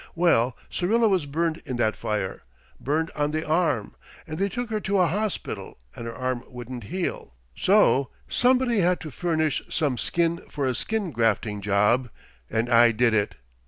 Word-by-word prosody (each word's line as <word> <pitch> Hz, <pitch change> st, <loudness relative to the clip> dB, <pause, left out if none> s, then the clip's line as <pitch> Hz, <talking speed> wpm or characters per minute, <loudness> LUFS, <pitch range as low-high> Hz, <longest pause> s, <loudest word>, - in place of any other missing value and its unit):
Well, 130 Hz, -8 st, +3 dB
Syrilla 225 Hz, +6 st, +2 dB
was 185 Hz, -8 st, +1 dB
burned 165 Hz, +3 st, -1 dB
in 130 Hz, -, -4 dB
that 110 Hz, -2 st, +1 dB
fire 105 Hz, -3 st, -3 dB, 0.4 s
burned 160 Hz, +4 st, -1 dB
on 145 Hz, 0 st, 0 dB
the 155 Hz, +1 st, -2 dB
arm 155 Hz, -, +1 dB, 0.3 s
and 155 Hz, +2 st, -6 dB
they 200 Hz, +1 st, +1 dB
took 245 Hz, +3 st, -4 dB
her 215 Hz, -, 0 dB
to 200 Hz, -1 st, 0 dB
a 180 Hz, -, +5 dB
hospital 205 Hz, +5 st, -3 dB, 0.2 s
and 115 Hz, -, -6 dB
her 115 Hz, -, -6 dB
arm 130 Hz, -1 st, -2 dB
wouldn't 125 Hz, -2 st, -8 dB
heal. 170 Hz, -, -4 dB, 0.2 s
So 185 Hz, -9 st, +4 dB, 0.2 s
somebody 250 Hz, -2 st, +3 dB
had 180 Hz, 0 st, +2 dB
to 155 Hz, -, -7 dB
furnish 160 Hz, 0 st, 0 dB
some 145 Hz, -7 st, 0 dB
skin 170 Hz, +6 st, +1 dB
for 140 Hz, -, -2 dB
a 130 Hz, -, +1 dB
skin 210 Hz, -, -2 dB
grafting 110 Hz, -3 st, 0 dB
job, 105 Hz, +5 st, +2 dB, 0.4 s
and 110 Hz, +2 st, 0 dB
I 120 Hz, -1 st, +6 dB
did 115 Hz, +1 st, +2 dB
it. 105 Hz, -2 st, +1 dB
150 Hz, 170 wpm, -25 LUFS, 120-180 Hz, 0.4 s, I